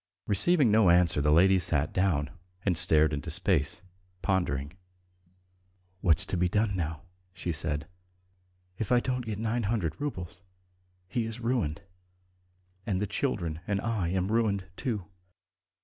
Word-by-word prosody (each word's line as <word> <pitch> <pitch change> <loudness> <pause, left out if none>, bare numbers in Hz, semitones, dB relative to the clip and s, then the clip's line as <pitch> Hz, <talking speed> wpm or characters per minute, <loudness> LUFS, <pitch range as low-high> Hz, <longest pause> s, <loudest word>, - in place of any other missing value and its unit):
Receiving 125 - +4
no 105 -3 +5
answer, 85 -3 +4
the 75 +1 +2
lady 95 +4 +5
sat 75 -2 0
down 90 -6 0 0.3
and 95 -3 +2
stared 80 -2 +4
into 70 -2 -4
space, 75 +5 +1 0.4
pondering. 75 -6 -1 1.3
"What's 80 -5 +3
to 95 - -3
be 90 +1 +1
done 105 0 +1
now?" 80 -2 -3 0.3
she 90 -1 -4
said. 75 -1 -3 0.9
"If 110 - -3
I 125 - +5
don't 125 -1 -3
get 105 -2 -3
nine 115 +2 -1
hundred 100 - -2
roubles, 95 - -5 0.7
he 115 +4 -2
is 115 +1 -6
ruined, 115 - -1 1.0
and 95 -4 -1
the 105 - 0
children 95 - -2
and 100 -2 0
I 110 -5 -1
am 95 +2 -1
ruined, 105 -4 +1
too. 105 -7 -3
95 Hz, 140 wpm, -28 LUFS, 80-110 Hz, 1.3 s, no